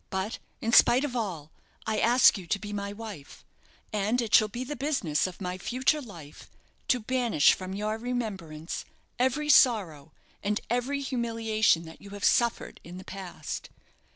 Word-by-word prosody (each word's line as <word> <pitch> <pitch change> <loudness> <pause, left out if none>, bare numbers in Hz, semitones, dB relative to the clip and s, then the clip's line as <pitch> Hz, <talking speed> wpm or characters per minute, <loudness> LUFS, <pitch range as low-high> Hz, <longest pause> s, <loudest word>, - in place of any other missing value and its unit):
But, 190 +3 -3 0.2
in 230 +1 -1
spite 250 +3 +6
of 255 -4 -5
all, 175 -10 -4 0.3
I 220 -1 0
ask 240 +1 +6
you 185 -5 -8
to 200 - +1
be 205 0 -7
my 200 0 -3
wife; 205 -9 -10 0.5
and 210 +4 +1
it 230 -3 -3
shall 215 - +7
be 240 +4 -5
the 295 +3 -5
business 265 - 0
of 180 - -10
my 180 -1 -4
future 260 - 0
life 170 - -12 0.4
to 250 - +3
banish 235 - +3
from 185 0 -6
your 215 +2 -2
remembrance 195 -10 -4 0.4
every 260 +4 +1
sorrow 190 - +4 0.3
and 210 +1 0
every 255 +4 0
humiliation 225 -8 +1
that 160 -1 -12
you 200 - -11
have - - -10
suffered 235 -3 +1
in 175 +2 -10
the 185 - -10
past. 185 -5 -7
215 Hz, 165 wpm, -28 LUFS, 185-245 Hz, 0.5 s, shall